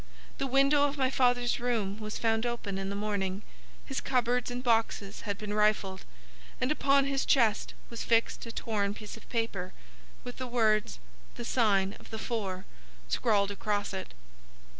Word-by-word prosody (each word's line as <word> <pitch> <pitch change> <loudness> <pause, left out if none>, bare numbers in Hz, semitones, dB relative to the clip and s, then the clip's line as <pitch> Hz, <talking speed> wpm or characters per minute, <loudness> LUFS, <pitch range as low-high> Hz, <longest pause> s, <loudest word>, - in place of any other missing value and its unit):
The 275 - 0
window 275 +2 +4
of 285 +1 -5
my 260 -1 +2
father's 245 -2 +2
room 220 -4 -1
was 215 -1 -4
found 225 -1 +1
open 235 -5 -2
in 195 0 -3
the 200 - -3
morning, 200 -1 -2 0.4
his 270 - -3
cupboards 250 -1 +1
and 245 +1 -4
boxes 225 -4 +1
had 200 - -1
been 210 0 -4
rifled, 210 -3 +1 0.5
and 255 - +1
upon 275 -2 +4
his 275 0 0
chest 225 -6 +2 0.2
was 230 - -4
fixed 230 0 +2
a - - -5
torn 205 -3 -1
piece 210 -1 -8
of 225 - -15
paper, 210 -6 -2 0.5
with 245 - -7
the 255 - -4
words 215 - +2 0.4
'The 240 - -6
sign 200 -6 +2
of - - -15
the 220 - -5
four' 200 -5 -3 0.4
scrawled 200 - +2
across 205 0 -2
it. 190 - -6
225 Hz, 165 wpm, -30 LUFS, 200-245 Hz, 0.5 s, window